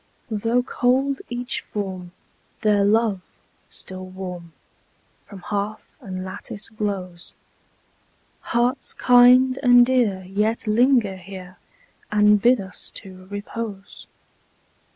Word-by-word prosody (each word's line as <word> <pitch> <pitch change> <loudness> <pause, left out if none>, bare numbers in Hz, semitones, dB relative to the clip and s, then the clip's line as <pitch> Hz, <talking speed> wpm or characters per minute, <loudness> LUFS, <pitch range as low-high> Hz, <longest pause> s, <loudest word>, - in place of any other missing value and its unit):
Though 230 +3 +1
cold 265 +2 +1
each 245 +1 -3
form, 190 -4 -6 0.5
their 205 -2 +3
love, 210 -1 +2 0.5
still 185 0 -7
warm, 180 -2 -8 0.8
From 195 -3 -11
hearth 205 +2 -4
and 185 -5 -6
lattice 195 +2 -7
glows: 195 -5 -5 1.0
Hearts 245 +3 -1
kind 250 +1 +6
and 245 -2 +7
dear 235 -7 +1
yet 210 +5 -1
linger 225 -3 +3
here, 185 0 -11 0.5
And 210 0 +4
bid 245 +2 +4
us 190 -2 -7
to 185 -1 -9
repose. 205 0 -7
210 Hz, 100 wpm, -22 LUFS, 190-245 Hz, 1.0 s, and